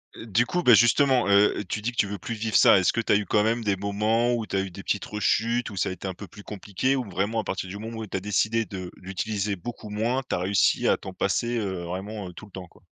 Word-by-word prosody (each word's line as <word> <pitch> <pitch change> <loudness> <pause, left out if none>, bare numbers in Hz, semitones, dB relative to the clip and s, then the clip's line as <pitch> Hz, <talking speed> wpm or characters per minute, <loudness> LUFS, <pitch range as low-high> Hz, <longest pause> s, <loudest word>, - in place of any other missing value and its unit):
Heu, - - -9
du 115 +3 +2
coup, 180 +5 -1
bah, 125 - +7
justement, 125 +2 +4
heu, 100 +1 +4
tu 105 - -3
dis 120 - -2
que 120 - -18
tu 100 - +2
veux 100 0 -5
plus 115 +6 -5
vivre 110 0 -3
ça. - - +7
Est-ce 90 - +2
que 115 - 0
tu - - -1
as - - +6
eu 105 - +1
quand 105 +1 +2
même 115 +1 0
des 100 -2 +1
moments 105 +5 +1
où 115 -2 -1
tu - - -5
as 95 - +2
eu 95 -1 -5
des 95 +2 -10
petites 105 - -1
rechutes 115 +3 0
où 100 - -9
ça 90 - 0
a - - -4
été 95 +1 -6
un 95 - -3
peu 100 +3 -10
plus 105 +4 -13
compliqué? 105 +6 -2
Ou 130 - -1
vraiment 100 +5 -1
à 110 - -1
partir 95 -1 -4
du 100 - -6
moment 115 +2 -7
où 110 -1 -5
tu 95 - -3
as - - -2
décidé 110 +3 0
de 95 -3 -7
l'utiliser 100 +2 -3
beaucoup 110 +3 -8
moins, 115 +5 0
tu - - 0
as - - -2
réussi 95 +2 +2
à - - +4
t'en - - -9
passer, 120 0 0
heu, 95 -5 -3
vraiment, 95 +3 -5
heu, - - -12
tout 110 - -11
le 100 - -18
temps 90 -1 -8
quoi? - - -24
105 Hz, 300 wpm, -25 LUFS, 95-115 Hz, -, bah